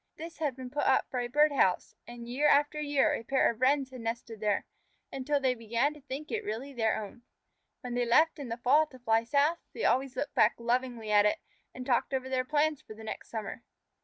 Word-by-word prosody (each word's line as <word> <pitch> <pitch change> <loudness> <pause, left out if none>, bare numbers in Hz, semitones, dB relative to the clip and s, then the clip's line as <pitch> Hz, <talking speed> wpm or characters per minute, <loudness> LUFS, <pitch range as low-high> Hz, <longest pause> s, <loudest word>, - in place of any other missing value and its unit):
This 330 +1 -9
had 295 -5 -1
been 255 -1 -8
put 290 - -1
up 265 - +3
for 255 - -1
a 245 - -2
bird 295 +4 +4
house, 190 -10 +1
and 235 0 -9
year 270 +5 +1
after 295 +1 +3
year 285 -2 +2
a - - -2
pair 265 +1 +2
of 230 +1 -13
Wrens 270 0 +2
had 255 -2 -9
nested 230 -1 -5
there, 210 -1 0 0.5
until 280 +2 -1
they 260 -2 +2
began 235 +5 0
to 300 - -15
think 275 +2 -7
it - - -2
really 235 +7 -5
their 225 -3 0
own. 215 +3 -9 0.6
When 250 -3 -6
they 245 0 +1
left 310 +6 +4
it - - -5
in 265 - -6
the 230 - -3
fall 290 +6 +4
to 260 - -14
fly 225 -2 +1
south, 295 +6 +2 0.2
they - - -4
always 260 0 +1
looked 285 0 -3
back - - +4
lovingly 235 -2 -1
at 205 0 +6
it, 210 - +1 0.3
and 255 - -8
talked 260 +1 +1
over 260 0 -3
their 260 -1 0
plans 300 +2 +1
for 215 - -12
the 220 - -11
next 220 - -7
summer. 225 +2 -5
255 Hz, 235 wpm, -30 LUFS, 235-285 Hz, 0.6 s, at